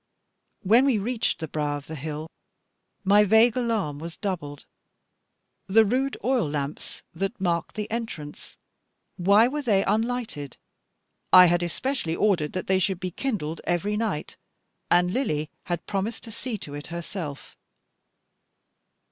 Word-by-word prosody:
When 230 Hz, +7 st, +5 dB
we 265 Hz, -5 st, +3 dB
reached 225 Hz, +3 st, -1 dB
the 160 Hz, -1 st, -5 dB
brow 145 Hz, -1 st, -1 dB
of 145 Hz, -, -10 dB
the 160 Hz, -, -8 dB
hill, 155 Hz, +1 st, -5 dB, 0.8 s
my 205 Hz, +1 st, +6 dB
vague 220 Hz, +3 st, +5 dB
alarm 220 Hz, -, -1 dB
was 165 Hz, +2 st, -7 dB
doubled. 155 Hz, -8 st, -4 dB, 1.0 s
The 220 Hz, +3 st, +5 dB
rude 260 Hz, +5 st, 0 dB
oil 250 Hz, -, +2 dB
lamps 145 Hz, 0 st, -4 dB
that 195 Hz, +6 st, -3 dB
marked 170 Hz, -3 st, -1 dB
the 210 Hz, -1 st, -2 dB
entrance, 220 Hz, -11 st, -6 dB, 0.6 s
why 200 Hz, +6 st, +5 dB
were 295 Hz, +3 st, -2 dB
they 205 Hz, -7 st, +2 dB
unlighted? 220 Hz, -, -2 dB, 0.7 s
I 180 Hz, 0 st, +10 dB
had 175 Hz, 0 st, +3 dB
especially 175 Hz, -, -2 dB
ordered 175 Hz, -8 st, +1 dB
that 185 Hz, -, -3 dB
they 190 Hz, 0 st, +2 dB
should 190 Hz, -1 st, 0 dB
be 185 Hz, -1 st, -3 dB
kindled 170 Hz, -, -3 dB
every 195 Hz, +4 st, 0 dB
night, 210 Hz, -8 st, -2 dB, 0.5 s
and 180 Hz, +1 st, +3 dB
Lily 155 Hz, -, -1 dB
had 175 Hz, -2 st, -3 dB
promised 205 Hz, +3 st, -3 dB
to 225 Hz, -, -7 dB
see 230 Hz, +1 st, -4 dB
to 145 Hz, -7 st, -9 dB
it 145 Hz, +1 st, -7 dB
herself. 170 Hz, -3 st, -6 dB
190 Hz, 140 wpm, -26 LUFS, 160-225 Hz, 1.0 s, I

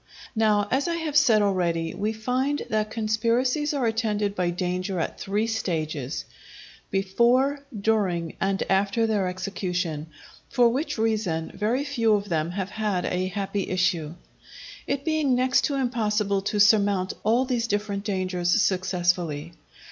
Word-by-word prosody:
Now, 210 Hz, -2 st, +3 dB
as 270 Hz, +5 st, +1 dB
I 340 Hz, -, 0 dB
have 320 Hz, -3 st, -3 dB
said 240 Hz, -8 st, +5 dB
already, 170 Hz, -4 st, 0 dB
we 210 Hz, +2 st, -1 dB
find 255 Hz, +6 st, -1 dB
that 215 Hz, 0 st, 0 dB
conspiracies 235 Hz, +7 st, 0 dB
are 280 Hz, -4 st, 0 dB
attended 215 Hz, -3 st, 0 dB
by 180 Hz, -3 st, 0 dB
danger 180 Hz, +1 st, -2 dB
at 160 Hz, -, -3 dB
three 205 Hz, +3 st, -1 dB
stages: 160 Hz, -, -3 dB, 0.6 s
before 240 Hz, +9 st, +2 dB, 0.2 s
during, 195 Hz, -6 st, 0 dB
and 195 Hz, 0 st, +1 dB
after 200 Hz, +4 st, +2 dB
their 210 Hz, -4 st, +1 dB
execution; 180 Hz, -4 st, -3 dB, 0.4 s
for 245 Hz, -2 st, +4 dB
which 265 Hz, +5 st, -2 dB
reason 210 Hz, -8 st, -1 dB
very 235 Hz, +7 st, 0 dB
few 230 Hz, -7 st, +2 dB
of 205 Hz, 0 st, -3 dB
them 160 Hz, -1 st, 0 dB
have 190 Hz, +1 st, -4 dB
had 205 Hz, -5 st, -1 dB
a 185 Hz, +1 st, -1 dB
happy 195 Hz, +1 st, -3 dB
issue; 175 Hz, -4 st, 0 dB, 0.7 s
it 280 Hz, 0 st, -2 dB
being 310 Hz, -5 st, +2 dB
next 255 Hz, +1 st, +3 dB
to 285 Hz, -, -1 dB
impossible 210 Hz, -6 st, 0 dB
to 205 Hz, +1 st, -2 dB
surmount 200 Hz, -2 st, +4 dB
all 235 Hz, +5 st, +3 dB
these 240 Hz, -3 st, -1 dB
different 205 Hz, -1 st, -2 dB
dangers 185 Hz, -1 st, 0 dB
successfully. 175 Hz, -5 st, 0 dB
205 Hz, 140 wpm, -25 LUFS, 185-230 Hz, 0.7 s, said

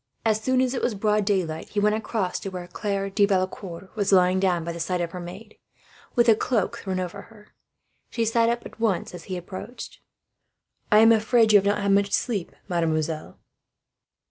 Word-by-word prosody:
As 220 Hz, -1 st, +2 dB
soon 260 Hz, +2 st, +2 dB
as 255 Hz, 0 st, +1 dB
it 255 Hz, -, -2 dB
was 235 Hz, -, 0 dB
broad 210 Hz, 0 st, +1 dB
daylight, 175 Hz, -6 st, -1 dB
he 210 Hz, -, -1 dB
went 210 Hz, +1 st, +3 dB
across 215 Hz, -4 st, -2 dB
to 195 Hz, -, -5 dB
where 180 Hz, -2 st, -6 dB
Claire 195 Hz, +2 st, -3 dB
de 205 Hz, +1 st, +2 dB
Valecourt 185 Hz, -1 st, -3 dB
was 205 Hz, -2 st, 0 dB
lying 185 Hz, -1 st, +4 dB
down 180 Hz, -3 st, +1 dB
by 170 Hz, -, -4 dB
the 170 Hz, -, -7 dB
side 180 Hz, +2 st, -1 dB
of 170 Hz, -1 st, -2 dB
her 180 Hz, -, -6 dB
maid, 190 Hz, +5 st, -10 dB, 0.6 s
with 240 Hz, -1 st, +4 dB
a 225 Hz, -, +8 dB
cloak 220 Hz, -2 st, -1 dB
thrown 190 Hz, -1 st, -3 dB
over 185 Hz, +2 st, -6 dB
them. 215 Hz, -2 st, -17 dB, 0.6 s
She 230 Hz, -, -1 dB
sat 230 Hz, +1 st, +2 dB
up 235 Hz, 0 st, -2 dB
at -, -, -11 dB
once, 215 Hz, -7 st, 0 dB
as 175 Hz, -, -9 dB
his 185 Hz, -, -4 dB
step 175 Hz, -, -7 dB
approached. 205 Hz, +7 st, -9 dB, 0.9 s
"I 210 Hz, +1 st, +7 dB
am 225 Hz, +1 st, +7 dB
afraid 225 Hz, 0 st, +4 dB
you 205 Hz, -, +9 dB
have 200 Hz, -, -2 dB
not 205 Hz, 0 st, +1 dB
had 200 Hz, -, +2 dB
much 200 Hz, 0 st, +2 dB
sleep, 210 Hz, -8 st, -1 dB, 0.2 s
mademoiselle." 160 Hz, -2 st, -2 dB
200 Hz, 205 wpm, -25 LUFS, 180-220 Hz, 0.9 s, you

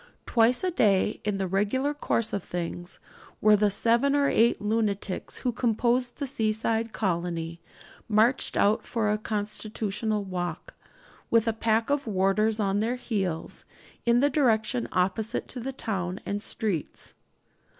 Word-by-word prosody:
Twice 235 Hz, +4 st, +3 dB
a 370 Hz, -, +1 dB
day, 210 Hz, -, +2 dB
in 210 Hz, -1 st, -1 dB
the 195 Hz, -, -1 dB
regular 210 Hz, +10 st, 0 dB
course 230 Hz, -6 st, 0 dB
of 200 Hz, -, -2 dB
things, 175 Hz, 0 st, -5 dB, 0.4 s
were 215 Hz, 0 st, +6 dB
the 210 Hz, 0 st, +3 dB
seven 235 Hz, +7 st, +3 dB
or 285 Hz, -1 st, +3 dB
eight 235 Hz, -2 st, +3 dB
lunatics 210 Hz, -3 st, -2 dB
who 250 Hz, -, -1 dB
composed 240 Hz, +1 st, +1 dB
the 285 Hz, -, -2 dB
seaside 225 Hz, -2 st, 0 dB
colony 170 Hz, -4 st, -2 dB, 0.5 s
marched 225 Hz, +5 st, +3 dB
out 205 Hz, +2 st, +3 dB
for 220 Hz, -3 st, -1 dB
a 210 Hz, -, 0 dB
constitutional 215 Hz, 0 st, -2 dB
walk, 175 Hz, -4 st, -5 dB, 0.6 s
with 230 Hz, 0 st, +3 dB
a 225 Hz, -, +2 dB
pack 225 Hz, +2 st, +1 dB
of 285 Hz, -3 st, 0 dB
warders 210 Hz, +2 st, +1 dB
at 200 Hz, -1 st, +1 dB
their 230 Hz, +4 st, 0 dB
heels, 195 Hz, -9 st, -3 dB, 0.4 s
in 235 Hz, +1 st, +3 dB
the 285 Hz, -, +4 dB
direction 240 Hz, -4 st, +1 dB
opposite 190 Hz, +4 st, -1 dB
to 255 Hz, -, -5 dB
the 260 Hz, +3 st, -4 dB
town 190 Hz, -8 st, -3 dB
and 205 Hz, 0 st, -2 dB
streets. 205 Hz, -8 st, -2 dB
215 Hz, 145 wpm, -27 LUFS, 195-235 Hz, 0.6 s, were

